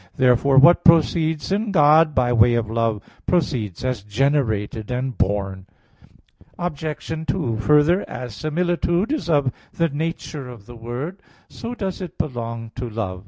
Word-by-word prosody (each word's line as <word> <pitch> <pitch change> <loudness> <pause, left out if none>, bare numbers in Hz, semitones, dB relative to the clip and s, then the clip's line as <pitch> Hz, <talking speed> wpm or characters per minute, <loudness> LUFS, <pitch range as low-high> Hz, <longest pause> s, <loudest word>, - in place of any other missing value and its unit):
Therefore 130 +2 +3
what 170 +6 +7
proceeds 160 -1 +3
in 205 +2 0
God 155 -2 +5
by 120 -1 +2
way 120 +1 +5
of 110 -2 -2
love, 115 -2 -1 0.2
proceeds 130 - -1
as 125 -5 -1
generated 110 -2 -1
and 125 0 -2
born. 95 -1 -2 0.9
Obj. 160 -1 -4
2: 130 - -1
Further, 150 - +3
as 125 -3 -6
similitude 175 - -1
is 305 - -2
of 145 -5 +2 0.2
the 165 -1 0
nature 150 -2 -4
of 115 -5 -12
the 120 - -12
word, 125 - -6 0.3
so 235 +2 -6
does 195 -4 -4
it 180 - -7
belong 115 -4 -4
to 125 -1 -4
love. 100 -5 -4
135 Hz, 145 wpm, -22 LUFS, 115-165 Hz, 0.9 s, what